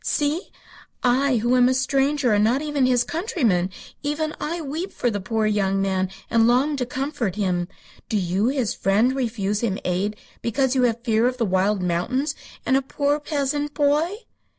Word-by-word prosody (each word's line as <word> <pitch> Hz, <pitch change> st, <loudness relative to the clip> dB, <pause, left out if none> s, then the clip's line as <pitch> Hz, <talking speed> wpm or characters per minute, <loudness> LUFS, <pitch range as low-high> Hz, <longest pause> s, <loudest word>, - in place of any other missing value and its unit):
See! 300 Hz, +6 st, -1 dB, 0.5 s
I 255 Hz, +2 st, +3 dB
who 240 Hz, +3 st, +2 dB
am 250 Hz, 0 st, +5 dB
a 260 Hz, -, +2 dB
stranger 270 Hz, -1 st, +1 dB
and 205 Hz, 0 st, +3 dB
not 250 Hz, +7 st, +2 dB
even 290 Hz, -4 st, +1 dB
his 245 Hz, -1 st, +3 dB
countryman, 245 Hz, -, 0 dB, 0.3 s
even 305 Hz, +1 st, -2 dB
I 335 Hz, +3 st, -2 dB
weep 320 Hz, +5 st, -4 dB
for 245 Hz, -, -1 dB
the 205 Hz, -2 st, -3 dB
poor 220 Hz, +2 st, -1 dB
young 195 Hz, -2 st, +1 dB
man, 190 Hz, -1 st, 0 dB, 0.2 s
and 230 Hz, -1 st, +3 dB
long 265 Hz, +5 st, +3 dB
to 250 Hz, -2 st, -2 dB
comfort 255 Hz, -, -2 dB
him. 180 Hz, -4 st, 0 dB, 0.4 s
Do 215 Hz, -, +1 dB
you, 190 Hz, +3 st, 0 dB
his 260 Hz, -4 st, 0 dB
friend, 220 Hz, +7 st, +2 dB
refuse 215 Hz, -6 st, -1 dB
him 205 Hz, -5 st, 0 dB
aid 190 Hz, +4 st, 0 dB, 0.3 s
because 260 Hz, +2 st, +1 dB
you 260 Hz, -, +2 dB
have 230 Hz, +1 st, -5 dB
fear 230 Hz, -1 st, +2 dB
of 255 Hz, 0 st, -2 dB
the 235 Hz, -, +1 dB
wild 190 Hz, +1 st, +1 dB
mountains 250 Hz, -, 0 dB, 0.3 s
and 260 Hz, -, +3 dB
a 270 Hz, -, +3 dB
poor 285 Hz, +2 st, 0 dB
peasant 290 Hz, 0 st, -2 dB
boy?" 295 Hz, +3 st, +2 dB
245 Hz, 180 wpm, -23 LUFS, 210-285 Hz, 0.5 s, am